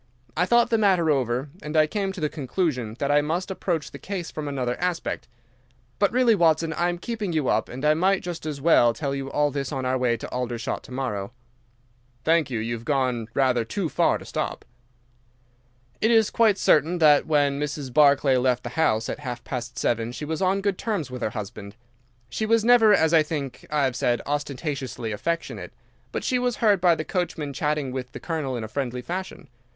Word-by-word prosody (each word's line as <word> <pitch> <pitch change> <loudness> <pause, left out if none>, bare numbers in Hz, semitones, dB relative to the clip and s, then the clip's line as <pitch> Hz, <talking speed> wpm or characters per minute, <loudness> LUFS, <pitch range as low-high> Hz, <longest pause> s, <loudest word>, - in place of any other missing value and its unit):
I 180 +3 +1
thought 240 +3 +4
the 225 - +3
matter 185 -6 +3
over, 130 0 0
and 150 +1 -3
I 155 - +6
came 195 +4 -2
to 190 - -8
the 155 - +1
conclusion 135 - -2
that 140 +1 0
I 145 0 +5
must 170 +6 -2
approach 175 -5 -2
the - - -9
case 185 -4 -5
from 155 -1 -5
another 130 -3 -2
aspect. 175 -7 -2 0.7
But 200 -2 +3
really, 245 -1 +4
Watson, 165 -4 +2
I 175 +3 +1
am 175 - -2
keeping 215 -2 -4
you 155 -5 0
up, - - +1
and 130 +4 -5
I 150 - +5
might 190 +4 +2
just 175 -3 -5
as 150 -2 -4
well 120 -6 +4
tell 140 -3 -2
you 135 -1 -4
all 145 +1 +1
this 140 -1 -3
on 135 -3 -3
our 130 0 0
way 120 -2 +1
to - - -7
Aldershot 120 -2 -3
to - - -13
morrow." 120 -5 -3 0.9
"Thank 160 -1 +3
you, 120 - -2
you 115 +2 -2
have 115 -1 -6
gone 130 -5 0
rather 130 -3 +2
too 170 - -3
far - - +2
to - - -12
stop." - - -4 1.4
"It 220 - +3
is 225 -2 +4
quite 220 -4 +3
certain 160 +2 +3
that 150 -3 +5
when 145 -2 +2
Mrs. 145 -3 -4
Barclay 140 -2 +5
left 125 -1 +1
the 120 - -4
house 115 -6 +1
at - - -4
half 125 -4 -6
past 125 -1 -5
seven 115 0 0
she 150 - -5
was 160 +3 -3
on 190 +1 +2
good 200 -2 -1
terms 190 - -2
with 125 0 -6
her - - 0
husband. 100 -1 -7 0.5
She 215 - -3
was 225 0 +3
never, 235 -3 +6
as 160 -5 +4
I 160 - +7
think 145 -4 -5
I 150 -1 +1
have 130 -2 0
said, 120 -1 +1
ostentatiously 140 -4 -3
affectionate, 165 +11 -3 0.4
but - - -3
she 250 - +1
was 245 -1 0
heard 205 -5 +3
by 175 -2 +5
the 155 - -4
coachman 165 -6 -3
chatting 150 -2 -1
with 125 -1 -5
the - - -7
Colonel 150 -7 -3
in 115 - -4
a - - -4
friendly 125 +1 -3
fashion. 185 +6 -6
150 Hz, 210 wpm, -25 LUFS, 125-175 Hz, 1.4 s, I